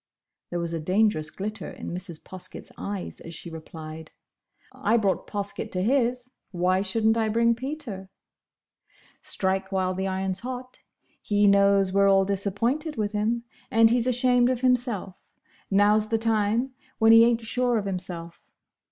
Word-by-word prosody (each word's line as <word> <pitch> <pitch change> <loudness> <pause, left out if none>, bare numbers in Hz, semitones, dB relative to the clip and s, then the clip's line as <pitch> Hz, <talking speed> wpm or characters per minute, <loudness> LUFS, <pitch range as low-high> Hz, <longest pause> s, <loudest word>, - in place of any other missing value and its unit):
There 175 - -3
was 170 -1 -3
a 165 - -2
dangerous 185 -1 +1
glitter 205 +3 -5
in - - -7
Mrs. 175 -2 -6
Poskett's 185 -1 -10
eyes 200 -2 -5
as 165 0 -9
she 170 - -9
replied, 160 0 -9 0.6
"I 225 +3 +1
brought 200 -4 0
Poskett 200 -1 -4
to 180 0 0
his: 250 +1 +1 0.2
why 185 +1 +1
should 205 +3 -1
n't 220 +1 +4
I 220 -1 +1
bring 230 +2 +3
Peter?" 240 -7 -6 1.1
"Strike 190 0 0
while 185 -1 0
the 190 +1 -2
iron's 190 0 -2
hot. 255 +1 -7 0.4
He 205 0 +2
knows 200 -1 +4
we're 200 0 +4
all 195 0 +4
disappointed 230 - -1
with 210 -2 -1
him, 220 +3 0 0.3
and 225 0 +5
he's 240 0 +2
ashamed 245 0 +3
of 255 -1 -1
himself. 245 -7 0 0.5
Now's 210 +2 +4
the 225 - +2
time, 225 +3 +1 0.3
when 225 0 +5
he 225 0 +9
ain't 235 0 +3
sure 245 +1 0
of 205 - -2
himself. 180 -3 -5
205 Hz, 155 wpm, -26 LUFS, 190-235 Hz, 1.1 s, he